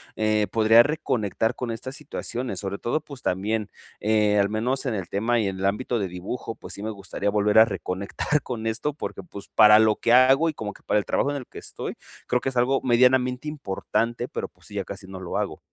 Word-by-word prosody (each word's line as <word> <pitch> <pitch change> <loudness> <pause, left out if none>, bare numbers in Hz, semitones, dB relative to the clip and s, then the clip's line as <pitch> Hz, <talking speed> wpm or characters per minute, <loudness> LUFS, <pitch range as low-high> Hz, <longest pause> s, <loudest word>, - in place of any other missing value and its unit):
eh, 110 -1 +1
podría 110 +1 +6
reconectar 120 - 0
con 120 -2 -4
estas 130 +4 -6
situaciones, 130 -4 -5
sobre 100 0 -4
todo, 135 +6 -1
pues 140 -3 -11
también, 105 +3 -1 0.3
eh, 105 -1 +2
al 100 - +3
menos 125 +6 -1
en 125 - 0
el 95 -4 -5
tema 115 +4 +1
y 105 - 0
en 95 0 -6
el 95 - -1
ámbito 115 +4 0
de 100 - -1
dibujo, 95 +6 -6
pues - - -10
sí 100 - -7
me 110 - -2
gustaría 100 0 -3
volver 105 +1 +4
a 110 - +9
reconectar 100 +8 -2
con 115 -3 -5
esto, 115 +7 -1
porque, 150 - -6
pues 100 - -11
para 105 0 +8
lo 110 -1 +4
que 115 - +2
hago 135 +5 +6
y - - -3
como 105 -6 -5
que - - -19
para 105 - +2
el - - -4
trabajo 140 - +1
en - - -3
el 130 - -7
que - - -10
estoy, - - -6 0.3
creo 125 - +2
que - - -4
es 130 - -9
algo 130 +3 +3
medianamente 125 +3 +3
importante, 120 -2 -2
pero, - - -4
pues - - -21
sí, 105 - -12
ya 100 -2 -2
casi 100 0 -8
no 95 0 -8
lo 90 -2 -4
hago. - - -3
110 Hz, 235 wpm, -25 LUFS, 100-125 Hz, 0.3 s, a